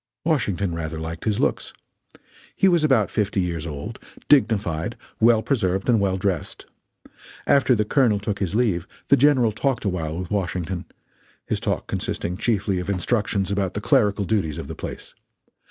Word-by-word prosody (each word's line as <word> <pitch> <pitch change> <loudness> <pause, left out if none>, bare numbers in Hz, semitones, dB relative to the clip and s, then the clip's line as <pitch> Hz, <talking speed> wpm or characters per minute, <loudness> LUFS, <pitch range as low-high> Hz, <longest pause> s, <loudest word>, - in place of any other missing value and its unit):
Washington 100 - 0
rather 80 -1 -4
liked 80 0 -6
his 105 -2 0
looks. - - -1 0.8
He 195 - +4
was 175 -4 +3
about 130 - +3
fifty 105 -2 0
years 85 -3 -2
old, 70 -2 -6 0.3
dignified, 105 - +2 0.2
well 115 -1 +5
preserved 95 -8 0
and 120 -3 +4
well 95 -1 +1
dressed. 95 -4 -3 0.8
After 135 -2 +4
the 105 -1 +1
Colonel 120 -3 +3
took 100 0 -3
his 95 0 -2
leave, 105 -8 +1 0.2
the 140 - +7
General 130 -5 +4
talked 125 +2 -1
a - - +2
while 80 -3 -3
with 90 +1 -5
Washington 90 -2 -2 0.6
his - - -1
talk - - -2
consisting 90 - -3
chiefly 100 -3 0
of 90 - -5
instructions 100 0 0
about 95 -2 -1
the - - -1
clerical 105 -6 +2
duties 95 -8 0
of - - -6
the - - -6
place. - - -8
100 Hz, 165 wpm, -23 LUFS, 90-115 Hz, 0.8 s, the